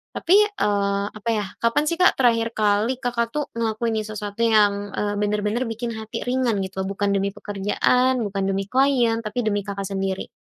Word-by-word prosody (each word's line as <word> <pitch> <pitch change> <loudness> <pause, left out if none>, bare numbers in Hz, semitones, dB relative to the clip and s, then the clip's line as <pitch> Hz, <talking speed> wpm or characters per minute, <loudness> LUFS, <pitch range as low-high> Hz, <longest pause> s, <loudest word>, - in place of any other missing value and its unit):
tapi, 345 - -3 0.2
eee, 200 - 0
apa 215 +2 -5
yah, 210 -2 -2
kapan 230 +6 +2
sih 335 - -2
Kak 365 - +5
terakhir 230 -3 +3
kali 215 +4 +2
Kakak 235 +1 -1
tuh 295 - +1
ngelakuin 225 -1 -1
ini 215 - -5
sesuatu 210 0 -6
yang, 205 -2 +2
eee, 205 0 -1
bener-bener 210 +4 0
bikin 230 +1 -4
hati 220 0 -5
ringan 245 -3 0
gitu 190 0 -4
bukan 200 0 -1
demi 200 0 0
pekerjaan, 235 +5 +1
bukan 195 -1 -2
demi 195 0 0
klien, 255 -4 +3
tapi 230 +2 -3
demi 205 -1 0
Kakak 200 0 -4
sendiri? 195 -1 -2
215 Hz, 180 wpm, -23 LUFS, 200-235 Hz, 0.2 s, Kak